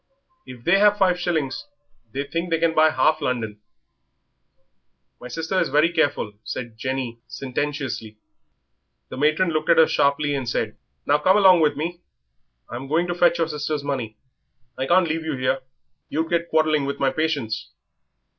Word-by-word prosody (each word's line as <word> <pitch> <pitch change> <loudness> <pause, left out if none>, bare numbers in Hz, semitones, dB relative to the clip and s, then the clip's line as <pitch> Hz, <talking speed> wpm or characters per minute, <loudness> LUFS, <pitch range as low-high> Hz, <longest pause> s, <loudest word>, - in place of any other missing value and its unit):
If 125 -2 -11
they 180 +7 +4
have 205 0 +5
five 185 -3 +2
shillings 155 -7 -2 0.4
they 140 +5 -2
think 165 +5 -3
they 165 - +2
can 165 0 +1
buy 155 0 +5
half 155 0 +2
London." 115 -6 -2 1.6
"My 125 - -9
sister 165 +8 -2
is - - +1
very 155 +4 +3
careful," 145 -9 0
said 120 -3 -6
Jenny, 130 -1 -4
sententiously. 135 -5 -4 0.9
The - - -7
matron 155 +5 +2
looked 155 -1 -2 0.2
sharply 140 +1 +2
at - - 0
her - - 0
and 125 -3 -4
said 110 -2 -2 0.3
"Now 145 +1 +3
come 185 +6 +4
along 190 -3 +6
with 150 -3 +2
me 170 +3 -4 0.7
I'm 125 +3 -7
going 160 +5 +1
to - - 0
fetch 175 -1 +3
your 165 - +1
sister's 150 -1 -3
money. 125 -7 -4 0.6
I 130 - -3
can't 175 +2 +4
leave 160 +1 -2
you 155 -4 -3
here 130 +1 0 0.5
you'd 160 +2 -2
get 170 0 0
quarrelling 155 -2 +2
with 140 - -3
my 135 -1 +2
patients." 140 -7 -2
150 Hz, 165 wpm, -23 LUFS, 130-165 Hz, 1.6 s, along